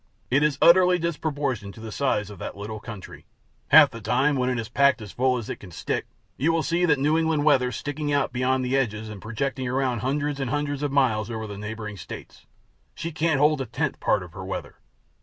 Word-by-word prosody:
It 140 +3 +4
is 150 -2 +2
utterly 180 +1 +7
disproportioned 145 - -2
to - - -12
the 110 0 -7
size 105 -7 0
of 100 - -11
that - - -6
little 105 +1 -6
country. 105 -3 -10 0.4
Half - - +8
the 115 - -9
time, 130 +7 +2
when 130 -1 +1
it 125 - -1
is 115 -1 -3
packed 140 +1 +3
as 105 -4 -9
full 130 0 +1
as 115 -3 -6
it - - -4
can 95 - -11
stick, 85 - -3 0.3
you 155 +6 +2
will 165 -1 +1
see 175 +1 +1
that 150 -4 +3
New 150 +4 +2
England 160 -2 +1
weather 130 -4 +4
sticking 145 +5 -3
out 140 -3 +1
beyond 130 +1 +1
the 125 +2 0
edges 110 -5 -1
and 105 -3 -8
projecting 130 +4 -3
around 130 -1 0
hundreds 145 +4 -1
and 135 -3 -2
hundreds 145 +1 -2
of 145 -1 -1
miles 120 -6 +2
over 110 -1 -4
the 105 -1 -7
neighboring 105 0 -6
states. 85 - -10 0.5
She 165 - -4
can't 160 -2 +1
hold 150 0 +3
a 130 - -4
tenth 135 +5 -2
part 90 - +1
of 85 -2 -12
her 95 - -7
weather. 95 - -6
130 Hz, 225 wpm, -25 LUFS, 110-145 Hz, 0.5 s, Half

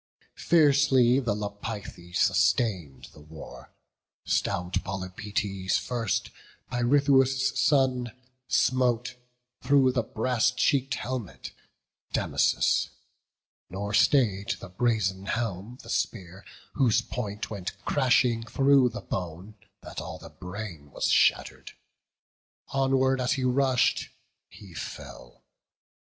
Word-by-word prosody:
Fiercely 140 -6 +4
the 120 -6 -1
Lapithae 100 -3 -7
sustain'd 85 - +1
the - - -15
war: 75 -4 -12 0.5
Stout 90 +1 -1
Polypoetes 95 0 -3
first, 115 -6 -2 0.4
Pirithous' 135 +1 +3
son, 130 -4 +2 0.4
Smote, 125 -1 +1 0.5
through 135 0 +4
the 125 -2 0
brass 120 +2 0
cheek'd 135 +1 +1
helmet, 125 -8 -6 0.6
Damasus; - - +1 0.8
Nor 100 +3 -5
stay'd 105 -5 +2
the 100 - -10
brazen 95 -2 -1
helm 115 +1 -3
the - - -13
spear, 95 -3 -3 0.3
whose 115 -4 +2
point 105 -4 -5
Went 100 -1 -5
crashing 125 -4 +2
through 135 +2 +3
the 120 +1 -7
bone, 90 +3 -6 0.3
that - - -7
all - - -7
the - - -13
brain 90 -6 -8
Was - - -2
shatter'd; - - +1 1.0
onward 135 0 +1
as 125 +3 +1
he 135 -2 -2
rush'd, 130 0 +1 0.4
he 95 -4 -14
fell. 60 -3 -9
115 Hz, 100 wpm, -27 LUFS, 95-130 Hz, 1.0 s, Fiercely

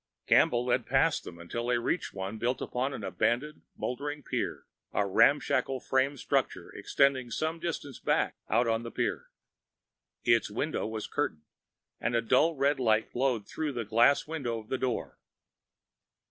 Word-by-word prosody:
Campbell 120 +1 +4
led 125 - +1
past - - +2
them 85 - -9
until 115 +8 -5
they 125 -1 +2
reached 120 +9 -1
one 95 +3 -5
built 125 +3 0
upon 130 +3 -2
an 125 -6 -6
abandoned, 120 - -1 0.2
moldering 145 +3 -4
pier, - - -3 0.3
a 105 - +2
ramshackle 130 +4 +3
frame 135 +3 +1
structure - - -1
extending 130 -3 +2
some 160 +8 -2
distance 155 -5 -4
back - - +1
out 120 0 +3
on 115 0 +1
the 115 - -6
pier. - - -2 1.0
Its 115 -2 +3
window 140 +8 -2
was 110 -1 -4
curtained, 75 -1 -2 0.6
but 115 -1 0
dull 165 +7 +4
red 140 0 +2
light 110 -3 +2
glowed 120 -5 0
through 155 -3 -3
the 120 -2 -3
glass 115 +6 +4
window 140 -8 -3
of 110 -1 -10
the 130 - 0
door. 125 -3 -2
125 Hz, 155 wpm, -30 LUFS, 115-140 Hz, 1.0 s, Campbell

